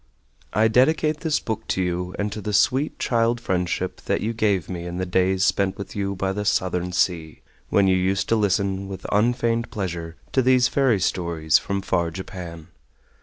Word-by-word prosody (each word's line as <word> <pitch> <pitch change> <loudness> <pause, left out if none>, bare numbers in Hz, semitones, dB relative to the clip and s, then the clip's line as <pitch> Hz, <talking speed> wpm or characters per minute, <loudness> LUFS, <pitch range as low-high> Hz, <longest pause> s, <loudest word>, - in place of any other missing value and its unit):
I 110 +3 +3
DEDICATE 150 +6 +3
THIS 160 -3 0
BOOK 110 -1 -4
TO - - -1
YOU 90 0 -2
AND 105 0 -2
TO 105 - -5
THE 105 0 -4
SWEET 130 +8 +2
CHILD 115 0 +1
FRIENDSHIP 90 -6 -2
THAT - - 0
YOU 115 +2 -1
GAVE 100 -6 +1
ME 90 -2 -5
IN 85 0 -5
THE 95 - -1
DAYS 95 +1 +2
SPENT 95 -1 +1
WITH 100 - -8
YOU 100 -1 -2
BY 95 0 -1
THE 105 +1 -3
SOUTHERN 90 -2 0
SEA, 85 -3 -1 0.3
WHEN 100 -1 +3
YOU 95 0 +4
USED 95 +1 0
TO 115 - +4
LISTEN 100 -2 0
WITH 95 -1 -8
UNFEIGNED 115 +2 +1
PLEASURE 85 -5 -4 0.2
TO 130 - +3
THESE 130 0 +4
FAIRY 130 -7 +2
STORIES 85 -4 +1
FROM 100 -1 -3
FAR 85 -3 0
JAPAN. 85 -2 -8
95 Hz, 185 wpm, -23 LUFS, 90-115 Hz, 0.3 s, YOU